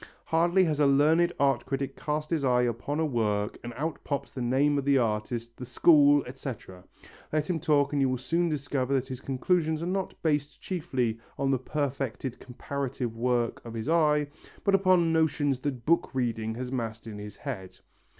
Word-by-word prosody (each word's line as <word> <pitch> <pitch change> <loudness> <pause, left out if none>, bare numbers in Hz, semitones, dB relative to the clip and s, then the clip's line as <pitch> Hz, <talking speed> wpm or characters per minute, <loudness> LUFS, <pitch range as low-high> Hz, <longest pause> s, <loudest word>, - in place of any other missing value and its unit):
Hardly 170 +3 +3
has 155 -4 0
a 145 - +5
learned 155 +5 +4
art 135 -2 +2
critic 135 0 -2
cast 150 +1 -3
his 160 -4 0
eye 125 -2 +3
upon 125 +5 -2
a 160 - +2
work 105 -6 -1
and 120 - -5
out 155 +5 -3
pops 140 -2 -3
the 130 - -6
name 140 +4 +2
of - - -3
the 140 0 +3
artist, 115 0 -2
the - - -7
school, 145 +2 +5
etc. 125 -8 -8 0.5
Let 155 -1 0
him 175 -3 -1
talk 145 -2 +2
and 145 - +2
you 135 - +3
will 130 - 0
soon 165 +7 0
discover 140 -3 -1
that 130 0 -1
his 130 -1 -6
conclusions 160 +4 0
are - - -2
not 190 +1 -3
based 150 -2 0
chiefly 130 - -2 0.2
on 135 0 +1
the 130 - +1
perfected 135 -2 -3
comparative 125 -2 -4
work 120 0 0
of 115 -1 -8
his 115 +6 -3
eye, 150 -3 +3 0.4
but 200 - +2
upon 185 -4 +4
notions 145 -4 +1
that 130 -4 -4
book 170 +2 +2
reading 115 -3 -1
has 125 +1 -5
massed 115 -3 -4
in 105 -2 -7
his 105 -1 -8
head. 100 -10 -6
140 Hz, 190 wpm, -28 LUFS, 120-155 Hz, 0.5 s, a